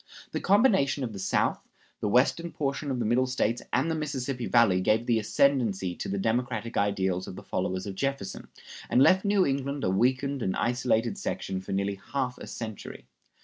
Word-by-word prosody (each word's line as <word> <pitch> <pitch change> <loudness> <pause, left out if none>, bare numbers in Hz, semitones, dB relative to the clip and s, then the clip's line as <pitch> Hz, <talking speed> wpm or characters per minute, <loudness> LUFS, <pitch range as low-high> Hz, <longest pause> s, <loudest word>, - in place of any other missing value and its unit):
The - - -2
combination 190 - +3
of 115 -4 -4
the 100 - -7
South, 95 - +1 0.4
the 105 - -1
western 140 +9 +2
portion 140 -1 -2
of 130 - -1
the 120 - -1
Middle 125 +4 +2
States, 120 -2 0
and 160 +5 +1
the - - +1
Mississippi 135 -5 -3
Valley 110 -6 +4
gave 110 +5 +2
the 115 -2 +2
ascendancy 110 -4 +1
to - - -4
the 100 - -1
democratic 115 +2 -1
ideals 95 -2 0
of - - -7
the - - -9
followers 95 +1 -2
of 100 - -5
Jefferson, 135 -2 -3 0.4
and 130 - +5
left 185 +5 +5
New 200 -2 +3
England 140 +1 -2
a 95 - +1
weakened 130 +6 +1
and 95 - -1
isolated 120 -2 0
section 95 -1 -3
for 95 - -8
nearly 100 0 -1
half 130 -3 -1
a - - -8
century. 110 - -8
120 Hz, 190 wpm, -28 LUFS, 100-140 Hz, 0.4 s, and